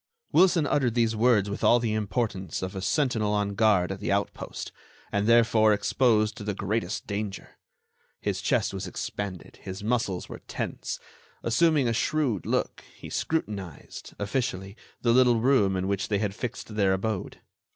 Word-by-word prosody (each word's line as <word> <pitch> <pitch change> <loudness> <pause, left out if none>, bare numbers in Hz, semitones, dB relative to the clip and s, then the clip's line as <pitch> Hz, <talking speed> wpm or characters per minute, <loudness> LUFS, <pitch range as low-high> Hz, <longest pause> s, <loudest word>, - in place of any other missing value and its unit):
Wilson 175 -4 +5
uttered 130 -5 +1
these 115 -2 +2
words 110 -3 +3
with 100 +1 -5
all 120 - +6
the 115 -2 -1
importance 105 -5 -2
of 95 +1 -4
a 95 - -4
sentinel 110 -1 +1
on 105 -1 0
guard 100 -4 +3
at 95 - -5
the 105 - -2
outpost, 100 0 -3 0.4
and 100 +1 0
therefore 115 -2 +5
exposed 110 +1 +2
to - - -8
the 105 -1 -2
greatest 100 0 -2
danger. 100 -1 -5 0.6
His - - -2
chest - - +1
was - - -4
expanded; 100 -4 -5
his 95 +2 -7
muscles 110 -5 -1
were - - -9
tense. - - -4 0.4
Assuming 145 +2 +3
a 115 - +1
shrewd 125 - 0
look, - - -1
he - - -10
scrutinized, 100 - -4
officially, 100 -3 -2 0.3
the 120 -1 +4
little 125 -2 +5
room 110 -6 +3
in 95 +1 -1
which 100 -1 -1
they 105 - +1
had 100 -1 -1
fixed 110 0 -6
their 100 -3 +3
abode. 100 0 -3
105 Hz, 160 wpm, -27 LUFS, 100-120 Hz, 0.6 s, all